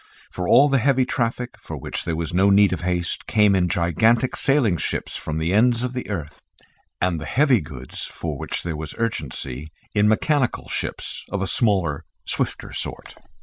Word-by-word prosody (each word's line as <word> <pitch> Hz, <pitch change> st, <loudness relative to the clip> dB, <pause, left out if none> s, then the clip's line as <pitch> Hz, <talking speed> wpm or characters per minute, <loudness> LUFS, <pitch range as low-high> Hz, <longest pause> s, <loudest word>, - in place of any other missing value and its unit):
For 90 Hz, -1 st, -3 dB
all 145 Hz, -, +7 dB
the 135 Hz, -2 st, +3 dB
heavy 130 Hz, +1 st, +3 dB
traffic, 120 Hz, 0 st, -2 dB
for -, -, -7 dB
which -, -, -5 dB
there 85 Hz, -2 st, -1 dB
was 80 Hz, -1 st, -3 dB
no 95 Hz, +3 st, +4 dB
need 100 Hz, -1 st, +5 dB
of 90 Hz, -, -4 dB
haste, 90 Hz, 0 st, -2 dB
came 105 Hz, -3 st, +4 dB
in 90 Hz, -2 st, +2 dB
gigantic 110 Hz, -, +2 dB
sailing 130 Hz, -10 st, +2 dB
ships -, -, -3 dB
from 80 Hz, 0 st, -3 dB
the 80 Hz, +3 st, 0 dB
ends 120 Hz, +3 st, +4 dB
of 125 Hz, 0 st, -2 dB
the 125 Hz, -3 st, -5 dB
earth, 80 Hz, -7 st, -5 dB, 0.6 s
and 90 Hz, -3 st, 0 dB
the -, -, -6 dB
heavy 130 Hz, -5 st, +3 dB
goods 70 Hz, -5 st, -6 dB
for -, -, -5 dB
which -, -, -4 dB
there 85 Hz, -2 st, -3 dB
was 75 Hz, 0 st, -6 dB
urgency 75 Hz, -, -3 dB, 0.2 s
in 105 Hz, 0 st, +3 dB
mechanical 130 Hz, +4 st, +1 dB
ships -, -, -3 dB
of 100 Hz, -1 st, -2 dB
a -, -, 0 dB
smaller 95 Hz, -, +1 dB, 0.2 s
swifter -, -, -2 dB
sort. -, -, -5 dB
100 Hz, 185 wpm, -23 LUFS, 85-120 Hz, 0.6 s, all